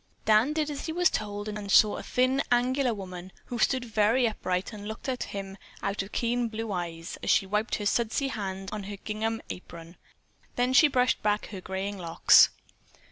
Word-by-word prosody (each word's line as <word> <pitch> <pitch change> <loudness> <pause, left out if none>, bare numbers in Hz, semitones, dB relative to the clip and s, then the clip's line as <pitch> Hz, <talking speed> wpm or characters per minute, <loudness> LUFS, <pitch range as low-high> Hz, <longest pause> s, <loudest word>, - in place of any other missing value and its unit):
Dan 220 +7 +4
did 305 -1 -1
as 285 - -5
he - - -2
was 350 0 +3
told 205 0 -3
and 210 -1 -5
saw 210 +1 +6
a - - -5
thin, 255 +2 +1
angular 250 +2 +2
woman, 185 -3 -7
who 240 - -5
stood 255 +2 +2
up 230 - -13
very 225 +4 +3
straight 180 +3 -2
and 205 -1 -8
looked 220 +4 -7
at 255 -2 -2
him 195 -1 -7 0.2
out 200 +1 -1
of 195 +2 -8
keen 240 0 0
blue 225 -1 -5
eyes, 170 -2 -5
as - - -3
she - - +4
wiped 210 +3 -1
her 210 - -4
sudsy 235 +5 0
hands 195 -4 -5
on 210 -2 -5
her 205 0 -6
gingham 220 +2 -3
apron. 170 -1 -10 0.6
Then 250 +1 +1
she 300 +3 +7
brushed 255 -2 +1
back 210 0 0
her 195 -3 -7
graying 190 +2 -4
locks. 165 -2 +6
215 Hz, 195 wpm, -28 LUFS, 195-245 Hz, 0.6 s, she